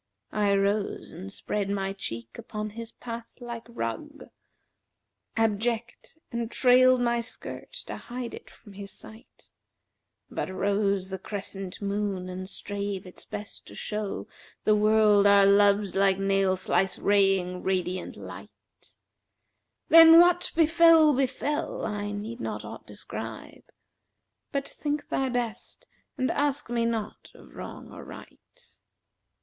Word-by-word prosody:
I 205 -1 +2
rose 200 +1 0
and 190 +4 -8
spread 200 0 -3
my 195 -1 -1
cheek 115 - -7
upon 215 0 -5
his 230 +1 -8
path 230 -1 -7
like 235 -2 -7
rug, 235 - -6 0.5
* - - -28
Abject, 230 +6 -3
and 235 -2 -2
trailed 255 +1 +5
my 235 -1 +1
skirt 235 - -8
to - - -6
hide 245 -1 -6
it - - -10
from 205 - -16
his 200 0 -8
sight; 220 +2 -14 0.8
But - - -4
rose 195 0 0
the 190 - -4
crescent 195 -1 -6
moon 200 -2 -2
and 185 +1 -6
strave 200 -1 -4
its 180 - -11
best 205 0 -8
to - - -11
show 210 -1 -4 0.2
* - - -27
The 215 - +5
world 210 -1 +5
our 200 -1 +7
loves 200 0 +4
like 195 -1 +3
nail 195 -1 +2
slice 190 0 +1
raying 195 -3 +2
radiant 185 -1 -2
light:[FN#367] - - -13 1.0
Then 330 0 +10
what 355 0 +4
befel 325 -1 +6
befel: 275 +3 -1
I 205 -1 -3
need 215 +4 -5
not - - -4
aught - - -9
describe; - - -8 0.4
* - - -55
But 280 -1 -2
think 295 0 -4
thy 270 -1 0
best, 240 -3 -4 0.3
and 255 - +1
ask 285 -4 0
me 235 -1 +1
naught 225 -2 -3
of - - -16
wrong - - -9
or - - -10
right. - - -12
210 Hz, 135 wpm, -27 LUFS, 195-240 Hz, 1.0 s, Then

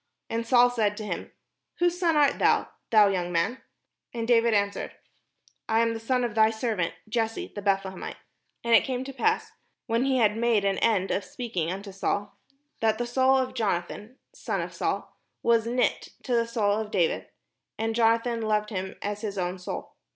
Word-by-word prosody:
And 230 0 -2
Saul 245 0 +5
said 210 -4 0
to 215 - -5
him: - - -5 0.5
"Whose 350 0 +1
son 335 -3 +2
art 290 -2 +3
thou, - - +3 0.2
thou 215 -2 +6
young 180 -2 -1
man?" 180 +9 0 0.5
And 230 -1 -2
David 235 -1 +4
answered: 200 0 -1 0.7
"I 225 +1 +3
am 230 0 +1
the 225 - -5
son 250 +2 0
of 235 -3 -2
thy 220 0 +5
servant 220 -6 -2
Jesse 225 0 -2
the 205 - -6
Beth 195 -1 +2
lehemite." 190 -1 -6 0.5
And 235 0 +1
it 225 - +7
came 255 -1 -2
to 275 +1 -7
pass, 440 +11 0 0.3
when 230 +2 +1
he 265 -1 +2
had 215 -3 +3
made 225 -3 +2
an 195 -1 +1
end 200 -4 +2
of 200 - 0
speaking 185 -4 -3
unto 195 +2 -6
Saul, 200 +1 -2 0.4
that 220 -1 +2
the 240 - -2
soul 260 +2 +3
of 260 -1 -1
Jonathan 210 +2 -3 0.2
[son - - -3
of - - -6
Saul], - - -3 0.3
was 230 -1 +3
knit 245 +1 0 0.2
with 245 - +1
the 230 0 +2
soul 215 -3 +1
of 220 -1 -4
David, 180 -6 0 0.5
and 225 0 -1
Jonathan 230 +1 +2
loved 210 -1 0
him 190 -1 -4
as 205 0 -3
his 205 -2 -4
own 180 0 -2
soul. 180 - -6
225 Hz, 190 wpm, -27 LUFS, 205-240 Hz, 0.7 s, it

